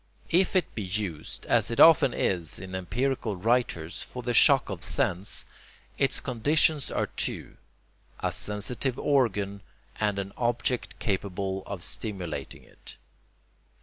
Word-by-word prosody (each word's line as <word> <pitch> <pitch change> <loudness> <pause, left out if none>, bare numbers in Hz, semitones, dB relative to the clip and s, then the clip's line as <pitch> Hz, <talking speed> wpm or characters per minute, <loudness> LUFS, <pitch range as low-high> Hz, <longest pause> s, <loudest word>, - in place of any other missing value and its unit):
If 185 +3 +3
it 185 - +1
be 110 - -4
used, 95 -5 -4
as - - +2
it 115 - -3
often 160 -5 +8
is 85 -8 -1
in 95 +1 -8
empirical 110 +5 -1
writers, 95 -5 0
for 125 - -6
the 120 0 -1
shock - - +6
of - - -5
sense, 90 +3 0 0.5
its 135 -1 +1
conditions 145 +3 +2
are - - 0
two: - - -4 0.6
a - - -1
sensitive 120 +5 -1
organ 105 -8 +1 0.4
and 105 -2 0
an 100 0 -4
object 120 +1 -1
capable 95 -1 -2
of 100 -4 -6
stimulating 95 -8 -3
it. - - -14
105 Hz, 130 wpm, -27 LUFS, 95-125 Hz, 0.6 s, often